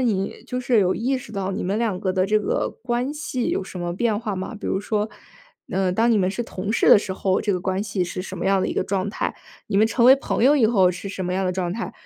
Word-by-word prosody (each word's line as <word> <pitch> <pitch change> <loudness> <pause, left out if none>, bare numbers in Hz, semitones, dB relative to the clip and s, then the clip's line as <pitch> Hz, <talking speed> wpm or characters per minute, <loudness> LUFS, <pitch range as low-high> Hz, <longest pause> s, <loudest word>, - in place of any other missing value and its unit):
你 215 -4 -1
就 250 -1 -3
是 245 -2 +2
有 185 -2 +3
意 255 +4 0
识 225 - -11
到 195 -2 -2
你 190 - -3
们 195 +3 -1
两 220 -5 0
个 185 -1 -1
的 185 0 +2
这 215 +2 +2
个 210 - -1
关 245 +3 -1
系 295 -5 -3
有 190 - -1
什 185 - -8
么 175 0 -2
变 215 +2 0
化 215 -4 -3
吗？ 190 +6 -5
比 - - -6
如 190 - 0
说， 210 0 -1 0.6
呃， 190 -1 +1
当 225 +5 +2
你 225 - +4
们 185 -1 +2
是 240 - -3
同 200 -2 -4
事 - - +2
的 - - +9
时 195 -2 -4
候， 190 0 0
这 205 -2 0
个 180 - -1
关 190 +1 -1
系 205 -3 -2
是 180 +1 -4
什 185 0 -7
么 - - -4
样 195 0 +3
的 - - 0
一 - - -2
个 - - +1
状 195 0 -1
态？ - - -3 0.3
你 - - 0
们 215 +2 +5
成 235 +1 +1
为 265 - +9
朋 270 - -2
友 290 +3 +6
以 235 - +4
后 195 -5 +4
是 190 +2 -6
什 190 -1 -4
么 180 - -2
样 190 - 0
的 180 - 0
状 180 -1 -2
态？ 225 +3 -4
200 Hz, 315 characters per minute, -23 LUFS, 185-230 Hz, 0.6 s, 的